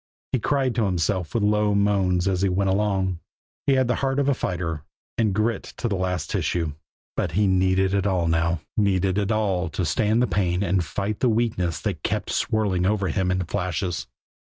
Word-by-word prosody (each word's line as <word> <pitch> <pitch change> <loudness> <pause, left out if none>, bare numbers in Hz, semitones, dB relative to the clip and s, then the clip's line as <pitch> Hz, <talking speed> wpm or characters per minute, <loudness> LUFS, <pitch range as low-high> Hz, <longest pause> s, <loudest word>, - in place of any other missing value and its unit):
He 130 - +1
cried 135 +1 +1
to 115 -2 +1
himself 90 0 -1
with 115 - +2
low 105 0 +2
moans 100 -3 +2
as 95 -2 +1
he 100 - +2
went 95 +1 +1
along. 95 -3 0 0.5
He 140 - +5
had 130 -1 +3
the 125 - +2
heart 135 0 0
of 140 -1 +1
a 140 - +4
fighter, 85 - -3 0.3
and 110 -3 +2
grit 110 +2 -1
to - - -1
the 105 - -1
last 90 -1 -2
tissue; 80 -4 -1 0.4
but - - -1
he 105 +4 +3
needed 95 0 +2
it 100 0 +1
all 90 -4 +1
now 80 0 +1
needed 95 -2 +2
it 100 +1 0
all 95 -5 0
to 90 +3 -2
stand 105 +8 +2
the 125 - +4
pain 95 -3 0
and 95 -1 +1
fight 100 +5 -3
the 125 - +3
weakness 110 -8 0
that - - -3
kept - - -2
swirling 95 -4 +1
over 100 -2 +1
him 90 +3 0
in 90 -1 0
flashes. 90 -1 -2
95 Hz, 200 wpm, -24 LUFS, 90-105 Hz, 0.5 s, He